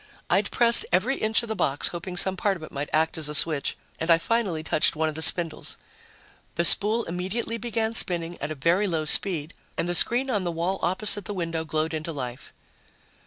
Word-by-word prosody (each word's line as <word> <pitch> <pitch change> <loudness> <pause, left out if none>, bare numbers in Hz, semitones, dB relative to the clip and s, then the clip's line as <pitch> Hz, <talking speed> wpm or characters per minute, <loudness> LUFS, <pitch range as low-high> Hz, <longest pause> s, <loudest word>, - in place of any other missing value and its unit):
I'd - - +1
pressed 235 -1 +5
every 220 +10 0
inch 220 +2 0
of - - -7
the 220 - -3
box, 140 -7 -1
hoping 180 +1 -7
some 190 +1 +3
part 195 +1 -1
of 160 - -14
it - - -10
might 145 +1 -6
act 160 +1 -1
as 150 -1 -1
a 150 - -4
switch, 150 -1 +1 0.2
and 160 - -4
I 165 - +6
finally 190 -4 -2
touched 155 - +1
one 160 +1 -1
of 155 - -4
the 160 - -8
spindles. 165 -1 +4 0.8
The 170 - 0
spool 215 +6 +5
immediately 190 +7 -5
began 225 -1 -3
spinning 175 -5 +2
at 145 - -4
a 155 - -5
very 170 +9 0
low 160 -4 -3
speed 160 -1 0 0.2
and - - -2
the 175 - -2
screen 245 +9 +3
on 205 -5 -1
the 175 - -3
wall 170 +4 -3
opposite 200 +2 +1
the 205 - -6
window 165 -2 -4
glowed 155 +1 -3
into 155 +1 -5
life. 125 -4 -8
175 Hz, 215 wpm, -24 LUFS, 160-205 Hz, 0.8 s, I